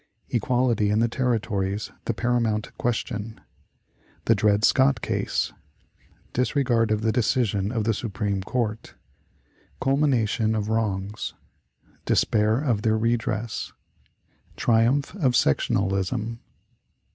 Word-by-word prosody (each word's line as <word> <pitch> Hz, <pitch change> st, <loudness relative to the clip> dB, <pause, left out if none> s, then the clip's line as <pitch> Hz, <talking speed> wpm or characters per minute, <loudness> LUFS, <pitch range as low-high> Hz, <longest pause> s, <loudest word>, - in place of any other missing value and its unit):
Equality 120 Hz, -3 st, +1 dB
in 105 Hz, -, +2 dB
the 115 Hz, +1 st, +3 dB
Territories 110 Hz, -5 st, -1 dB
the 115 Hz, -, 0 dB
Paramount 115 Hz, -3 st, 0 dB
Question. 115 Hz, -2 st, -2 dB, 0.9 s
The 115 Hz, -, +5 dB
Dred 105 Hz, 0 st, +3 dB
Scott 135 Hz, +1 st, +4 dB
Case. -, -, -1 dB, 0.8 s
Disregard 125 Hz, -3 st, +1 dB
of 110 Hz, 0 st, +1 dB
the 110 Hz, 0 st, +2 dB
Decision 110 Hz, -4 st, +1 dB
of 115 Hz, -3 st, -1 dB
the 115 Hz, +1 st, +1 dB
Supreme 100 Hz, -2 st, -2 dB
Court. 110 Hz, +1 st, -3 dB, 0.8 s
Culmination 125 Hz, -6 st, +1 dB
of 105 Hz, -1 st, -2 dB
Wrongs. 105 Hz, -2 st, -2 dB, 0.7 s
Despair 110 Hz, +2 st, +2 dB
of 120 Hz, -8 st, 0 dB
their 110 Hz, -1 st, +2 dB
Redress. 115 Hz, -1 st, -1 dB, 0.8 s
Triumph 120 Hz, +5 st, +2 dB
of 135 Hz, -9 st, +2 dB
Sectionalism. 100 Hz, -, 0 dB
115 Hz, 100 wpm, -25 LUFS, 105-120 Hz, 0.9 s, The